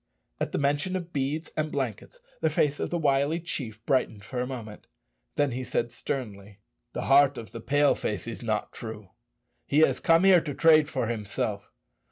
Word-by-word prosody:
] - - -48
At - - -1
the - - -1
mention 145 +6 0
of 175 -2 -5
beads 145 +4 -2
and 155 0 -1
blankets 135 - -4 0.2
the - - +3
face 145 -1 +1
of - - -2
the 175 - -1
wily 145 +1 +2
chief 120 -10 -5
brightened 120 -6 0
for 125 +3 -5
a 125 - -2
moment. 115 -5 -8 0.5
Then 145 -2 +2
he 125 +2 -3
said 120 -1 -1
sternly, 105 -6 -5 0.4
"The - - -3
heart 140 -1 +5
of 115 - -8
the 115 - -7
Pale 145 +3 +3
face 105 -3 -3
is 115 -1 -6
not 110 -3 -2
true. 110 -4 -8 0.6
He 145 +2 +3
has - - +4
come 165 +2 +4
here 190 -3 +7
to 145 -3 -5
trade 155 -1 +5
for 130 -6 -1
himself. 110 -3 -3
135 Hz, 195 wpm, -27 LUFS, 115-150 Hz, 0.6 s, here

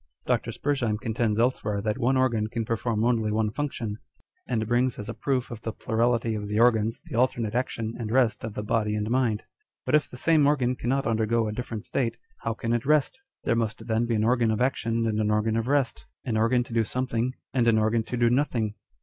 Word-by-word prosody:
Dr. - - 0
Spurzheim 130 -7 -1
contends 110 -2 -1
elsewhere 115 -4 +1
that 105 +4 -2
one 130 +2 +2
organ 120 -5 +2
can 115 +1 -3
perform 115 -1 -1
only 115 -3 +2
one 110 0 +1
function, 115 -6 -3 0.5
and 110 -3 0
brings 120 +2 +1
as 105 - -6
a 115 - -4
proof 125 +2 -1
of 115 -2 -7
the 115 - -3
plurality 115 +1 0
of 105 -1 -4
the 105 +1 0
organs 115 -1 +3
the - - -7
alternate 115 -3 +1
action 115 -2 -2
and 110 -2 -3
rest 120 -1 +2
of 110 -2 -5
the 105 - -3
body 105 0 0
and 105 +1 -2
mind. 120 -4 +1 0.4
But - - -2
if 150 -1 +3
the 125 - -10
same 155 +1 +4
organ 130 -4 +2
cannot 135 +3 -1
undergo 115 0 +1
a - - -2
different 115 -2 -5
state, 120 -4 -1 0.2
how 115 - -2
can 115 0 -2
it 120 - 0
rest? 150 - +2 0.2
There 115 - +1
must 110 -2 -2
then 115 +1 0
be 115 - +1
an 105 - +1
organ 120 0 +3
of 110 -1 0
action 115 -3 0
and 110 -1 0
an 105 -1 +1
organ 105 +1 +1
of 115 +1 -1
rest, 140 -1 0 0.2
an 120 -4 -1
organ 115 +3 +3
to 120 - -10
do 115 -1 +3
something 125 +1 -2 0.2
and 125 -3 +2
an 115 -1 +5
organ 110 +1 +2
to 125 - -4
do 120 0 +3
nothing 120 -5 +1
115 Hz, 225 wpm, -26 LUFS, 110-125 Hz, 0.5 s, an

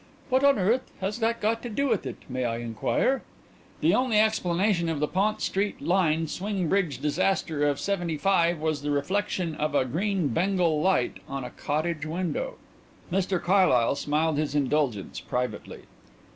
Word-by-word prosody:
"What 260 +1 +2
on 280 -2 +5
earth 225 +7 +1
has 195 +4 -3
that 230 0 0
got 225 +2 0
to 240 - -5
do 280 +6 0
with 225 -6 0
it, - - -5
may 130 -1 -3
I 115 -1 -1
inquire?" 120 - 0 0.6
"The - - +4
only 250 -4 +3
explanation 190 -4 +2
of 160 -3 -2
the 150 - +1
Pont 205 +5 0
St 200 +1 -1
Lin 165 -3 +2
swing 190 +2 -2
bridge 190 -7 +1
disaster 150 0 0
of 145 - -2
'75 175 -2 +1
was 155 -2 -1
the 145 - -3
reflection 175 +3 -1
of 150 -1 -2
a 130 - +3
green 180 - 0
bengal 170 +1 +1
light 185 -8 +1
on 135 -1 -4
a 125 - -7
cottage 155 +1 -2
window." 185 - -2 0.6
Mr 185 0 +1
Carlyle 175 -12 +3
smiled 150 +2 0
his 150 -2 -1
indulgence 140 -7 0
privately. 125 0 -4
170 Hz, 160 wpm, -27 LUFS, 150-200 Hz, 0.6 s, on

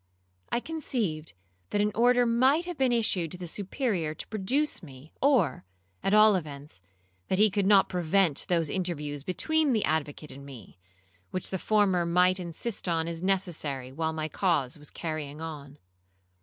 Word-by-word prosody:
I - - +1
conceived 235 - -3 0.4
that 205 - 0
an 210 +1 +2
order 245 +2 +4
might 260 +8 +3
have 355 0 -5
been 265 -3 +2
issued 190 -8 +1
to - - -7
the 180 - -7
Superior 185 - -2
to - - -6
produce 255 +9 0
me, 140 -1 -13
or, 250 - +2 0.4
at - - 0
all 215 0 +7
events, 145 - -6 0.5
that 190 - 0
he 210 +1 +5
could 200 -1 +1
not 200 -1 +6
prevent 175 -2 +1
those 170 -3 +2
interviews 150 -5 -3
between 305 - +1
the 220 - +1
advocate 150 -1 -2
and 140 - -10
me, 130 -8 -12 0.5
which 185 - -3
the 190 - -2
former 200 -4 +2
might 180 +2 +3
insist 180 +5 -3
on 165 -1 0
as 165 -1 -4
necessary 160 -9 -1
while 160 +3 -2
my 155 -1 -3
cause 155 -8 0
was 150 -1 -9
carrying 155 -3 -5
on. 150 -3 -8
180 Hz, 165 wpm, -28 LUFS, 155-215 Hz, 0.5 s, all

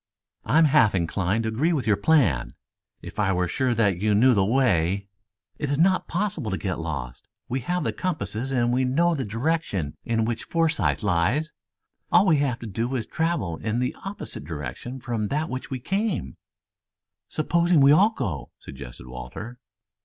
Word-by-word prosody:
"I - - +2
am 165 - +7
half 120 -8 +4
inclined 95 +5 0
to 110 - -1
agree 130 +10 +1
to 165 -4 +1
your 105 -3 +4
plan. 105 - +2 0.5
If - - -8
I 100 -2 +2
were 90 -1 +1
sure 125 +6 0
that 100 -5 +2
you 105 0 +2
knew 125 +5 +5
the 100 -4 +3
way 100 -5 +2 0.3
" 100 - -47
"It 145 - -2
is 140 - 0
not 185 +4 +3
possible 175 - -2
to 95 - -1
get 95 -3 -3
lost. 70 -7 -5 0.2
We 130 - -1
have 180 +8 -2
the - - -1
compasses 120 - -3
and 120 -2 +1
we 130 +1 +2
know 165 +7 +2
the 140 -5 -2
direction 115 - -2
in 115 -1 0
which 115 0 -3
Forsythe 145 - +1
lies. 105 - +1 0.6
All - - +6
we 160 -5 +4
have 140 -4 0
to - - -6
do 115 +5 -2
is 115 -4 -2
to - - -35
travel 160 - -1
in 110 +2 -2
an 125 - -1
opposite 195 - -5
direction 75 - -6
from 115 -4 -2
that 150 +7 -1
by - - -8
which 130 0 -5
we 130 - -3
came." 190 - -2 0.9
"Supposing 170 +1 +2
we 140 0 +7
all 190 +8 +6
go!" 100 - -4
suggested - - -10
Walter. 65 - -8
120 Hz, 190 wpm, -25 LUFS, 95-155 Hz, 0.9 s, am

